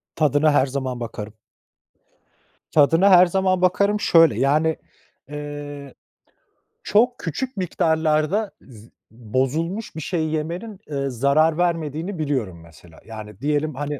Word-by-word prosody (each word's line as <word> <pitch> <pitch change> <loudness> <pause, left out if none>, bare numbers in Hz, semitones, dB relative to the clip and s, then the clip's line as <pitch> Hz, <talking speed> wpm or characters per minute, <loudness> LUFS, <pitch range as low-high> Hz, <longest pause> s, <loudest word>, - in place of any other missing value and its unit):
Tadına 150 0 +3
her 140 - +4
zaman 130 -2 -4
bakarım. 110 -3 -7 1.4
"Tadına 165 +6 +4
her 180 -1 +8
zaman 185 0 0
bakarım." 200 +3 +2
şöyle: 165 -6 +4
Yani, 155 +4 +2 0.5
ııı, 145 -1 -7 0.9
çok 240 +4 +2
küçük 235 - -4
miktarlarda 160 +2 0
zı 115 -3 -16 0.2
bozulmuş 135 - -3
bir 160 - -5
şey 160 +1 -2
yemenin, 170 +7 -4
ııı, 140 -1 -2
zarar 140 +6 +2
vermediğini 170 +1 -2
biliyorum 125 - -2
mesela. 85 0 -17
Yani 105 -3 -10
diyelim, 150 +1 -1
hani, 145 +1 -4
155 Hz, 115 wpm, -22 LUFS, 135-175 Hz, 1.4 s, her